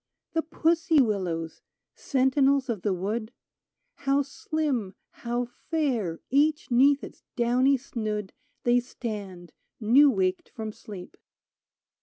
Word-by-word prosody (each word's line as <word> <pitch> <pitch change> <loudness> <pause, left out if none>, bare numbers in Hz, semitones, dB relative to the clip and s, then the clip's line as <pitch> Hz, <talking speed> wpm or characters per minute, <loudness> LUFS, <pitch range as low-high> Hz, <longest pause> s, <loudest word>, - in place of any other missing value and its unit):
The 325 - +2
pussy 325 0 +2
willows 180 -9 -1 0.2
— - - -62
sentinels 270 0 +2
of 220 -6 -2
the 205 - 0
wood 210 +5 -2 0.3
— - - -54
How 275 +1 +4
slim, 270 -7 -2 0.2
how 240 +1 -3
fair, 245 - -2
each 295 +1 +2
'neath 275 +3 +5
its - - -10
downy 250 +3 +3
snood. 215 -6 -4 0.3
They 245 0 +4
stand, 205 -8 -7 0.3
new 255 +7 +6
waked 190 -6 0
from 220 -2 -6
sleep 200 -4 -10
240 Hz, 120 wpm, -27 LUFS, 210-280 Hz, 0.3 s, new